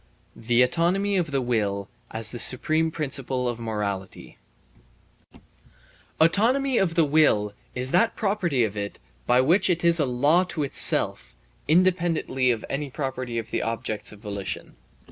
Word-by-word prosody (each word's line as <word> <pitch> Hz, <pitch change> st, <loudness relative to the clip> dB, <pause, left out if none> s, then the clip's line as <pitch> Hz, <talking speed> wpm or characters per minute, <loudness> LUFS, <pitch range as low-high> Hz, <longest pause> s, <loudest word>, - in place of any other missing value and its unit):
The 120 Hz, +2 st, +2 dB
Autonomy 180 Hz, +9 st, +1 dB
of 170 Hz, -4 st, -1 dB
the 135 Hz, -2 st, -1 dB
Will 100 Hz, -5 st, -1 dB, 0.2 s
as 110 Hz, 0 st, -3 dB
the 120 Hz, -, -5 dB
Supreme 155 Hz, +7 st, +2 dB
Principle 135 Hz, -5 st, -3 dB
of 120 Hz, -1 st, -3 dB
Morality 105 Hz, -4 st, -5 dB, 1.8 s
Autonomy 235 Hz, +11 st, +2 dB
of 170 Hz, -4 st, 0 dB
the 165 Hz, -3 st, +4 dB
will 140 Hz, -9 st, +2 dB, 0.2 s
is 130 Hz, +1 st, -3 dB
that 185 Hz, +6 st, +2 dB
property 190 Hz, -, 0 dB
of 105 Hz, -2 st, -2 dB
it 100 Hz, -1 st, -5 dB, 0.3 s
by 125 Hz, +1 st, +4 dB
which 170 Hz, +10 st, +3 dB
it 175 Hz, -1 st, 0 dB
is 170 Hz, 0 st, +4 dB
a 145 Hz, -, +1 dB
law 145 Hz, +8 st, +3 dB
to 170 Hz, -4 st, -3 dB
itself 140 Hz, -, +2 dB, 0.3 s
(independently 165 Hz, -6 st, +1 dB
of 115 Hz, -3 st, -1 dB
any 140 Hz, +1 st, -4 dB
property 130 Hz, -3 st, -4 dB
of 115 Hz, -1 st, -5 dB
the -, -, -1 dB
objects 115 Hz, -2 st, -3 dB
of 105 Hz, -, -12 dB
volition). 100 Hz, -3 st, -6 dB
135 Hz, 145 wpm, -24 LUFS, 115-170 Hz, 1.8 s, the